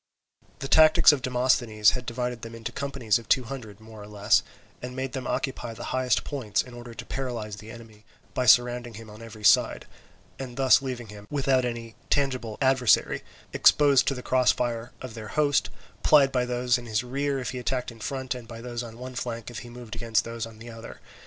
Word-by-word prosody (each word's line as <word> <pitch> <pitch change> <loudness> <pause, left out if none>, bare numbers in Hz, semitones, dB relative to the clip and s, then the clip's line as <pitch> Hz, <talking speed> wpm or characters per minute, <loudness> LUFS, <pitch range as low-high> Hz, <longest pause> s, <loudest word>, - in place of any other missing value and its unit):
The 135 - -5
tactics 155 +2 +7
of 145 -3 -1
Demosthenes 125 -4 +2
had 125 -1 -5
divided 125 0 -3
them 115 0 -8
into 115 -1 -6
companies 135 -6 0
of 115 - -15
two 130 - +4
hundred, 115 -5 -8
more 110 -1 -12
or 105 - -10
less, 105 -1 +3 0.4
and 125 0 -7
made 130 0 -3
them 130 -2 -4
occupy 120 -4 -3
the - - -8
highest 130 -3 +1
points 115 -7 -1
in 125 - -13
order 120 -1 -10
to - - -8
paralyse 120 -6 -4
the 110 +1 -11
enemy 110 -2 -13 0.3
by 125 - -1
surrounding 120 0 +4
him 110 0 -10
on 105 +2 -12
every 110 -2 -11
side - - +4 0.5
and 130 -2 -7
thus 135 -1 +5
leaving 125 -4 -5
him 105 0 -11
without 135 -3 +1
any 115 -2 -5 0.2
tangible 130 -6 0
adversary, 130 -3 +3 0.3
exposed 140 -3 +5
to 135 - +1
the 125 - -7
cross 130 -1 +3
fire 120 -1 -3
of 130 -3 -7
their 110 -2 -8
host; 145 +2 +1 0.3
plied 140 -3 +5
by 125 -1 +1
those 125 0 +1
in 120 - -11
his 110 +1 0
rear 140 +2 -1
if 130 - -3
he 125 - -5
attacked 125 0 -2
in 115 - -14
front, 130 +3 -3
and 125 -2 -9
by 115 -1 -9
those 120 0 -5
on 115 -1 -9
one 130 +1 -8
flank 120 -2 -5
if 120 - -6
he 120 - -10
moved 120 -2 -10
against 115 -1 +1
those 115 -1 -5
on 110 -1 -14
the 115 +2 -10
other. 115 0 -10
120 Hz, 210 wpm, -26 LUFS, 115-130 Hz, 0.5 s, tactics